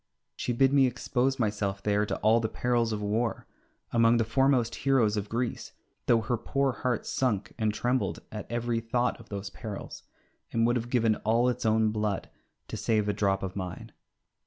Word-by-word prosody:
She - - -2
bid 135 +3 +3
me 135 -2 +5
expose 125 +2 0
myself 100 -3 -1
there 105 0 +1
to - - -2
all 110 +2 +5
the 110 -1 -1
perils 120 -1 0
of 105 -1 -3
war 110 +3 -1 0.5
among 115 0 +5
the 115 - +3
foremost 125 0 +2
heroes 125 -6 +2
of 105 -1 -3
Greece, 120 +1 -3 0.3
though 115 -1 +4
her 120 +2 -1
poor 135 +4 0
heart 125 -1 -2
sunk 110 -7 -1
and 110 -1 +2
trembled 125 +4 -1
at 105 0 -7
every 120 0 0
thought 120 +2 -1
of 115 - -15
those 100 -1 -5
perils, 105 -4 -7 0.5
and 115 0 +2
would 120 +1 +2
have 120 0 -2
given 115 -3 +2
all 115 +3 +2
its 120 -1 -1
own 110 0 +3
blood 105 -2 -2 0.4
to - - -4
save 110 -2 +1
a 105 - +1
drop 95 -1 0
of 95 -1 -4
mine. 95 -3 -6
115 Hz, 185 wpm, -28 LUFS, 105-120 Hz, 0.5 s, me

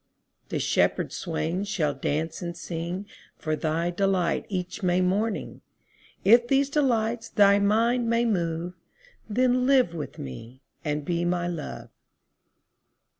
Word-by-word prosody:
20 - - -38
The - - 0
shepherd - - +1
swains 175 +3 -2
shall 155 -8 0
dance 155 +4 -2
and 170 -1 -5
sing 175 +4 -4 0.3
For 155 -1 -2
thy 165 +3 -1
delight 185 -2 0
each 185 -2 -4
May 180 -1 +2
morning: 200 +4 -1 0.6
If 235 +4 +6
these 275 +2 +2
delights 235 -6 +1
thy 200 -1 +5
mind 230 +4 +2
may 230 +1 +2
move, 175 -4 -1 0.6
Then 250 +3 +2
live 260 -10 +4
with 155 -4 -6
me 115 - -9 0.2
and 150 -1 -2
be 170 +1 0
my 175 0 0
Love. 170 -3 -6
180 Hz, 130 wpm, -26 LUFS, 165-225 Hz, 0.6 s, If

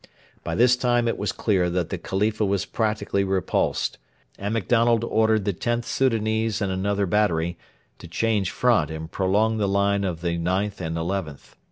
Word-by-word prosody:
By - - -3
this 125 +1 +5
time 120 -1 +1
it 115 - 0
was 105 -2 -1
clear 95 -5 +1
that 85 -1 -1
the - - -2
Khalifa 105 +3 -1
was 100 -1 0
practically 105 -3 -1
repulsed, 95 -2 -1 0.4
and 100 +1 -3
MacDonald 115 +1 +2
ordered 110 -2 +2
the 100 - 0
Xth 120 +6 -2
Soudanese 110 -3 0
and 100 -3 -1
another 100 +2 0
battery 85 -4 +1 0.4
to - - -10
change 100 +2 0
front 120 -12 +2
and 80 +1 -7
prolong 105 +4 +1
the 105 -2 +1
line 100 0 +1
of 85 -4 -3
the 85 -1 -1
IXth 95 +4 -1
and 80 -1 -3
XIth. 85 -4 -4
100 Hz, 170 wpm, -24 LUFS, 95-110 Hz, 0.4 s, this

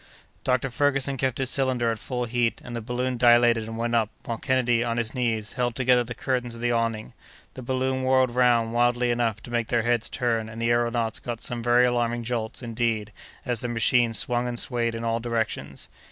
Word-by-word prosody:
Dr. 130 0 0
Ferguson 140 +1 +1
kept 130 -1 -1
his 135 -1 -1
cylinder 130 -4 +1
at 115 - -4
full 125 +1 -3
heat, 120 0 0
and 120 - -7
the 115 - -3
balloon 125 +2 -2
dilated 120 -2 +5
and 115 0 -6
went 120 +1 -2
up, 115 -2 +2 0.2
while 115 -2 -4
Kennedy, 120 -2 +1
on 115 -1 -2
his 115 -2 -1
knees, 115 -4 -1
held 120 -2 -1
together 125 -1 +3
the 120 0 -7
curtains 125 -3 -2
of 115 - -9
the 120 0 +1
awning. 115 -2 -1 0.4
The 130 - -8
balloon 130 +1 -1
whirled 130 -1 +2
round 120 -2 +3
wildly 120 0 +2
enough 115 -3 -1
to 120 - -9
make 120 -2 -1
their 120 -2 +1
heads 120 -1 0
turn, 115 -3 -1
and 110 +1 -9
the 115 0 0
aëronauts 120 -1 0
got 120 -2 -5
some 120 0 -2
very 120 +1 +4
alarming 120 -1 0
jolts, 115 0 -4
indeed, 115 -2 -2 0.3
as 125 -3 -1
their 120 - -3
machine 120 0 +2
swung 120 +3 +1
and 120 -1 -4
swayed 115 -2 +1
in 115 - -5
all 115 0 0
directions. 115 -1 -3
120 Hz, 210 wpm, -25 LUFS, 115-125 Hz, 0.4 s, dilated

